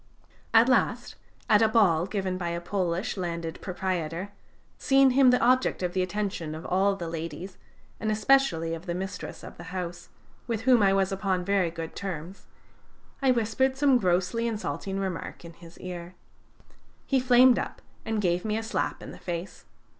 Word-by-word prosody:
At 225 Hz, +1 st, +6 dB
last, 260 Hz, -, +1 dB, 0.3 s
at 210 Hz, 0 st, +5 dB
a 225 Hz, -, +6 dB
ball 190 Hz, -7 st, +3 dB
given 190 Hz, -3 st, -2 dB
by 175 Hz, -2 st, -3 dB
a 170 Hz, 0 st, -2 dB
Polish 180 Hz, +2 st, -2 dB
landed 170 Hz, -3 st, -4 dB
proprietor, 180 Hz, -1 st, -3 dB, 0.5 s
seeing 270 Hz, -1 st, +5 dB
him 260 Hz, 0 st, +6 dB
the 250 Hz, -, +4 dB
object 255 Hz, -4 st, +2 dB
of 175 Hz, -1 st, -1 dB
the 185 Hz, -, +1 dB
attention 185 Hz, -5 st, -3 dB
of 160 Hz, -, -8 dB
all 195 Hz, +2 st, +2 dB
the 175 Hz, -3 st, -5 dB
ladies, 170 Hz, +3 st, -6 dB, 0.4 s
and 220 Hz, -, -2 dB
especially 215 Hz, -8 st, +2 dB
of 165 Hz, +3 st, -7 dB
the 170 Hz, -, -2 dB
mistress 190 Hz, +1 st, -6 dB
of -, -, -10 dB
the 175 Hz, -, -10 dB
house, 175 Hz, -1 st, -5 dB, 0.4 s
with 230 Hz, -3 st, -2 dB
whom 250 Hz, -1 st, +5 dB
I 195 Hz, -1 st, +5 dB
was 195 Hz, -1 st, +2 dB
upon 190 Hz, -2 st, -1 dB
very 195 Hz, -3 st, +2 dB
good 165 Hz, -1 st, -7 dB
terms, 185 Hz, -1 st, -6 dB, 0.7 s
I 270 Hz, -, +3 dB
whispered 255 Hz, +2 st, +1 dB
some 275 Hz, -3 st, +4 dB
grossly 185 Hz, +5 st, +1 dB
insulting 210 Hz, -3 st, -3 dB
remark 185 Hz, -2 st, -5 dB
in 170 Hz, -, -10 dB
his 170 Hz, 0 st, -15 dB
ear. 180 Hz, -1 st, -7 dB, 0.9 s
He 270 Hz, -, +2 dB
flamed 250 Hz, 0 st, +6 dB
up -, -, -5 dB, 0.2 s
and 220 Hz, -1 st, -2 dB
gave 175 Hz, -3 st, +1 dB
me 215 Hz, 0 st, -1 dB
a 225 Hz, -, -3 dB
slap 225 Hz, -, -2 dB
in -, -, -8 dB
the -, -, -11 dB
face. 175 Hz, +1 st, -6 dB
190 Hz, 175 wpm, -27 LUFS, 175-225 Hz, 0.9 s, At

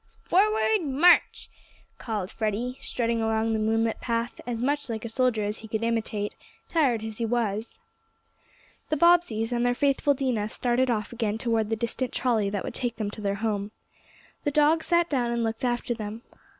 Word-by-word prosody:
"Forward 430 Hz, +2 st, +3 dB
march!" 300 Hz, +5 st, +4 dB, 0.5 s
called 210 Hz, -5 st, -3 dB
Freddie, 230 Hz, +4 st, -2 dB
strutting 230 Hz, -1 st, -1 dB
along 225 Hz, 0 st, +1 dB
the 220 Hz, -, 0 dB
moonlit 225 Hz, +1 st, 0 dB
path 230 Hz, 0 st, -2 dB
as 235 Hz, -2 st, -2 dB
much 285 Hz, +2 st, -1 dB
like 225 Hz, 0 st, -4 dB
a -, -, -4 dB
soldier 240 Hz, -2 st, +1 dB
as 210 Hz, +1 st, -3 dB
he 220 Hz, -, -10 dB
could 220 Hz, +1 st, -2 dB
imitate, 220 Hz, -3 st, -1 dB, 0.3 s
tired 260 Hz, -9 st, +1 dB
as 220 Hz, 0 st, -6 dB
he 230 Hz, -, 0 dB
was. 225 Hz, -2 st, -2 dB, 1.1 s
The 310 Hz, -, +1 dB
Bobbseys 310 Hz, -9 st, +3 dB
and 240 Hz, 0 st, 0 dB
their 245 Hz, 0 st, +2 dB
faithful 285 Hz, +1 st, +2 dB
Dinah 245 Hz, -6 st, -1 dB
started 250 Hz, +2 st, +1 dB
off 220 Hz, -1 st, -1 dB
again 220 Hz, -3 st, -1 dB
toward 225 Hz, -2 st, 0 dB
the 225 Hz, -, +1 dB
distant 235 Hz, +3 st, -2 dB
trolley 225 Hz, -5 st, +1 dB
that 200 Hz, -1 st, -3 dB
would -, -, -5 dB
take 245 Hz, -2 st, -2 dB
them 210 Hz, -2 st, -3 dB
to 215 Hz, -, -8 dB
their 200 Hz, -1 st, 0 dB
home. 205 Hz, -2 st, -1 dB, 0.7 s
The -, -, +1 dB
dog 300 Hz, +2 st, +3 dB
sat 340 Hz, 0 st, +2 dB
down 255 Hz, -6 st, 0 dB
and 235 Hz, 0 st, 0 dB
looked 225 Hz, +1 st, -3 dB
after 240 Hz, 0 st, 0 dB
them. 220 Hz, 0 st, -6 dB
230 Hz, 180 wpm, -26 LUFS, 220-255 Hz, 1.1 s, march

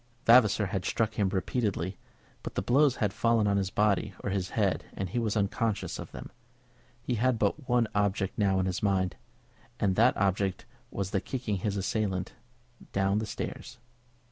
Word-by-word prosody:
Vavasor 115 Hz, -3 st, +6 dB
had 95 Hz, -1 st, -2 dB
struck 110 Hz, +3 st, 0 dB
him 100 Hz, -3 st, +1 dB
repeatedly, 95 Hz, -2 st, -1 dB, 0.5 s
but -, -, -7 dB
the 95 Hz, -, -1 dB
blows 135 Hz, +4 st, +4 dB
had 105 Hz, -3 st, 0 dB
fallen 115 Hz, -1 st, +2 dB
on 100 Hz, -1 st, +2 dB
his 95 Hz, -1 st, 0 dB
body 105 Hz, -1 st, +1 dB
or 100 Hz, -, -2 dB
his 95 Hz, -2 st, -1 dB
head, -, -, +1 dB
and 95 Hz, -, -3 dB
he 120 Hz, -, -1 dB
was 110 Hz, -2 st, 0 dB
unconscious 105 Hz, +1 st, -1 dB
of -, -, -8 dB
them. -, -, -9 dB, 0.7 s
He 125 Hz, -, -1 dB
had 130 Hz, -1 st, +3 dB
but 125 Hz, +7 st, -1 dB
one 120 Hz, -2 st, +3 dB
object 100 Hz, -1 st, 0 dB
now 95 Hz, -2 st, +2 dB
in 95 Hz, -, +1 dB
his 95 Hz, -1 st, -2 dB
mind, 95 Hz, -3 st, +1 dB, 0.6 s
and 95 Hz, -2 st, +2 dB
that 120 Hz, +4 st, +4 dB
object 95 Hz, -1 st, 0 dB, 0.2 s
was 95 Hz, -1 st, -4 dB
the 95 Hz, -, 0 dB
kicking 120 Hz, -6 st, -3 dB
his 100 Hz, +2 st, -2 dB
assailant 95 Hz, -2 st, -1 dB, 0.6 s
down 100 Hz, +1 st, +1 dB
the 110 Hz, -, -3 dB
stairs. 120 Hz, +1 st, -6 dB
100 Hz, 175 wpm, -29 LUFS, 95-115 Hz, 0.7 s, Vavasor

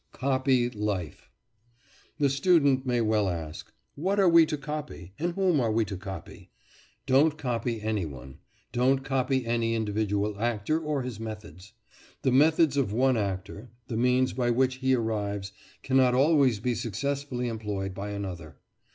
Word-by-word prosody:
COPY 130 Hz, -2 st, +1 dB
LIFE 105 Hz, -7 st, -4 dB, 0.9 s
The 145 Hz, -2 st, +3 dB
student 140 Hz, -3 st, +3 dB
may 120 Hz, -1 st, +1 dB
well 110 Hz, -3 st, +1 dB
ask, 80 Hz, -2 st, -6 dB, 0.2 s
"What 190 Hz, +7 st, -1 dB
are 195 Hz, -, +5 dB
we 165 Hz, -2 st, +6 dB
to 155 Hz, -1 st, -2 dB
copy, 140 Hz, -, -7 dB
and 170 Hz, +2 st, -1 dB
whom 185 Hz, -5 st, +2 dB
are 115 Hz, -3 st, +1 dB
we 110 Hz, 0 st, +1 dB
to 100 Hz, -1 st, -5 dB
copy?" 95 Hz, -2 st, -9 dB, 0.6 s
Don't 145 Hz, +4 st, +3 dB
copy 120 Hz, -5 st, -2 dB
any 105 Hz, -5 st, -1 dB
one; 65 Hz, -2 st, -11 dB, 0.3 s
don't 130 Hz, +2 st, +2 dB
copy 130 Hz, -1 st, 0 dB
any 115 Hz, 0 st, 0 dB
individual 105 Hz, -1 st, -1 dB
actor, 120 Hz, +6 st, 0 dB
or 150 Hz, -4 st, -2 dB
his 125 Hz, -4 st, -6 dB
methods. 105 Hz, -3 st, -9 dB, 0.5 s
The 130 Hz, -, +2 dB
methods 150 Hz, +2 st, +4 dB
of 130 Hz, -8 st, +1 dB
one 130 Hz, +4 st, +2 dB
actor 100 Hz, +2 st, -4 dB, 0.2 s
the 115 Hz, -, -3 dB
means 125 Hz, +2 st, +2 dB
by 120 Hz, -2 st, 0 dB
which 130 Hz, +2 st, +1 dB
he 130 Hz, 0 st, +2 dB
arrives 105 Hz, -4 st, -2 dB, 0.3 s
cannot 130 Hz, -2 st, +3 dB
always 135 Hz, -5 st, +4 dB
be 125 Hz, +3 st, -1 dB
successfully 130 Hz, +3 st, -3 dB
employed 105 Hz, -4 st, -4 dB
by 100 Hz, +2 st, -5 dB
another. 95 Hz, -6 st, -6 dB
120 Hz, 150 wpm, -27 LUFS, 105-135 Hz, 0.9 s, we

